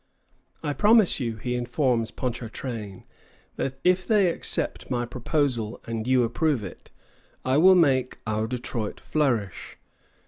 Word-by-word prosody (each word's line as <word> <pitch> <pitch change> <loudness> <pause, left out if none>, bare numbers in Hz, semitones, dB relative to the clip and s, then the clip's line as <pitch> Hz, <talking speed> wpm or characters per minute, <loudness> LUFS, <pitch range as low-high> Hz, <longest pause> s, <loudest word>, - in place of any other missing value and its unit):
"I 145 -2 -1
promise 210 0 +4
you," 115 -4 -2
he 125 +3 -4
informs 125 -1 0
Ponchartrain, 115 -4 -5 0.5
"that 135 0 -3
if 180 +1 +2
they 200 -5 +4
accept - - -2
my 120 -1 -1
proposal 120 -2 -1
and 115 0 -4
you 130 -1 +4
approve 130 +1 0
it, 95 - -10 0.6
I 130 +2 +2
will 185 +3 +7
make 135 -7 +2
our 110 0 -1
Detroit 120 -3 -4
flourish. 120 - -1
125 Hz, 130 wpm, -25 LUFS, 115-150 Hz, 0.6 s, will